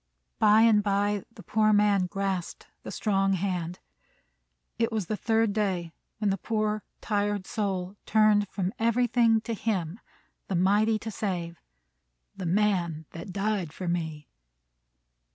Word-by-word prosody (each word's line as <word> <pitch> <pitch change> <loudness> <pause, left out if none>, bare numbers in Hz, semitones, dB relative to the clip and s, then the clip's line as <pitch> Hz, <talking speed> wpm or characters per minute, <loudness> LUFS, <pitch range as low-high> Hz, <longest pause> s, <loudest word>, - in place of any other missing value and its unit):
By 210 +1 +6
and 220 -2 +5
by 205 0 0
the 220 -3 -13
poor 215 +4 +2
man 205 -3 +3
grasped 195 -2 -3 0.2
the - - -8
strong 195 -2 +1
hand. 180 -2 -2 1.0
It 230 0 +1
was 215 -4 -1
the 215 - -2
third 225 -1 +1
day 190 -6 -1 0.3
when 210 -2 +1
the 195 - -2
poor, 215 0 -1 0.2
tired 205 -2 -1
soul 195 -3 -2
turned 215 -1 +4
from 190 0 -2
everything 230 -1 +3
to 230 - -4
him, 195 -4 -2 0.5
the 190 - -2
Mighty 205 +5 +3
to 220 +1 -6
save, 175 -5 -4 0.7
"the 185 - -4
Man 175 -4 +1
that 170 +3 -8
died 200 -4 -1
for 185 - -6
me." 160 -3 -3
205 Hz, 135 wpm, -27 LUFS, 185-215 Hz, 1.0 s, By